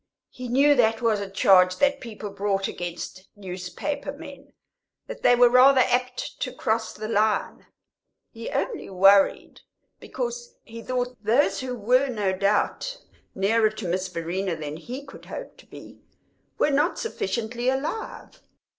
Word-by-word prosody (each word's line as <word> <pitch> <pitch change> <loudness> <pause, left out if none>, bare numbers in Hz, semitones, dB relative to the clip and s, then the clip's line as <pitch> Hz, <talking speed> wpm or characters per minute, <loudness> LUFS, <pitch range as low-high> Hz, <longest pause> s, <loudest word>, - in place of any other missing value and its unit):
He 250 0 -8
knew 275 +4 +4
that 225 -3 +2
was 220 -3 +2
a 200 -1 -5
charge 185 -1 +4
that 280 0 +2
people 215 -4 -8
brought 195 -1 -1
against 175 +2 -7
newspaper 190 +10 -5
men 285 -1 -12 0.5
that - - -9
they 245 - +5
were 245 0 +6
rather 255 +2 +6
apt 250 0 -1
to - - -2
cross 220 0 -1
the 215 0 -7
line. 215 0 0 0.6
He 230 -1 -7
only 465 -6 -3
worried 195 +1 +3 0.4
because 480 -1 -5
he 230 0 -10
thought 250 -2 -3
those 235 +7 +2
who 255 -1 -4
were 250 +5 +2
no 205 -6 -1
doubt 205 - 0 0.4
nearer 215 +3 +3
to 215 -3 -7
Miss 185 +2 -1
Verena 175 +2 -3
than 150 -1 -6
he 255 +10 -8
could 275 - -13
hope - - -8
to - - -18
be - - -13 0.6
were 300 - +2
not 295 +5 +1
sufficiently 240 - -2
alive. 290 +12 -4
230 Hz, 145 wpm, -25 LUFS, 195-265 Hz, 0.6 s, were